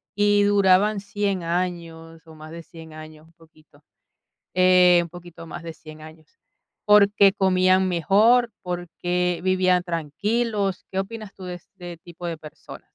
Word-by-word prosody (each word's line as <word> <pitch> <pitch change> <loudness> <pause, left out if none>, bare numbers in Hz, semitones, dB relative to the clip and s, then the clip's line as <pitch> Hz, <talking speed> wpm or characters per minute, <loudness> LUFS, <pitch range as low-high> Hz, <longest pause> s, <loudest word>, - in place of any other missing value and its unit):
y 205 0 +2
duraban 200 +1 +3
100 200 -2 -3
años 165 -2 -5
o 160 - -15
más 155 0 -12
de 165 0 -9
100 160 -2 -14
años, 155 0 -13
un 165 - -26
poquito?, 155 -3 -24 0.7
eh, 180 -1 +5
un 170 - -9
poquito 175 -1 -12
más 175 +1 -9
de 165 -1 -8
100 155 0 -14
años, 155 0 -14 0.6
porque 200 -1 +5
comían 185 -1 +2
mejor, 215 +8 +3
porque 175 0 -3
vivían 185 -1 +1
tranquilos. 195 +5 -3
¿Qué 190 - -4
opinas 215 +1 -6
tú 190 - -12
de 180 -1 -6
este 175 0 -12
tipo 175 +1 -11
de 165 -2 -5
personas? 155 -1 -13
180 Hz, 150 wpm, -22 LUFS, 165-195 Hz, 0.7 s, eh